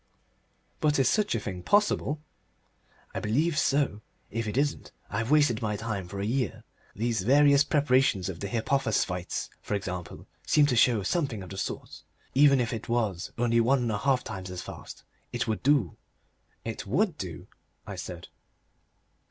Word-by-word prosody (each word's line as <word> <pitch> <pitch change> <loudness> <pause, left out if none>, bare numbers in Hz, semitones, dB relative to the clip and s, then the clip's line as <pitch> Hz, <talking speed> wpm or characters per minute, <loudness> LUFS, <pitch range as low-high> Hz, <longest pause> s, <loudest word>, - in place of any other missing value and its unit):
"But 150 -1 +2
is 135 - +3
such 210 -1 +2
a - - 0
thing 95 -4 -5
possible?" 155 - +1 0.9
"I - - -2
believe 150 +10 +1
so. 135 -7 +1 0.3
If 115 0 -2
it 105 - -3
isn't, 145 +1 0 0.2
I've 115 +1 -1
wasted 145 -7 +4
my 105 -2 -1
time 105 -3 -4
for 100 +2 -7
a 100 - -1
year. 125 -1 -1 0.3
These 115 0 0
various 140 +5 +5
preparations 130 - +2
of 90 -4 -5
the 100 - -3
hypophosphites, 110 -6 -1
for - - -2
example, 90 -3 -5 0.2
seem 150 -1 +5
to 130 - +1
show 120 0 +5
that 100 - -3
something 130 - -1
of 90 - -10
the 95 - -7
sort... - - -5 0.3
Even 140 0 +6
if 120 -1 0
it 115 - -6
was 110 -7 -1
only 115 0 +2
one 125 +2 +3
and 115 - 0
a 105 - -1
half 130 +1 +2
times 95 -3 -6
as 90 -1 -6
fast - - -10 0.3
it - - -2
would 110 -1 -1
do." 135 - +2 0.7
"It 115 -2 -5
WOULD 165 - +1
do," 85 -6 -6 0.4
I - - -6
said. - - -7
115 Hz, 170 wpm, -28 LUFS, 100-140 Hz, 0.9 s, Even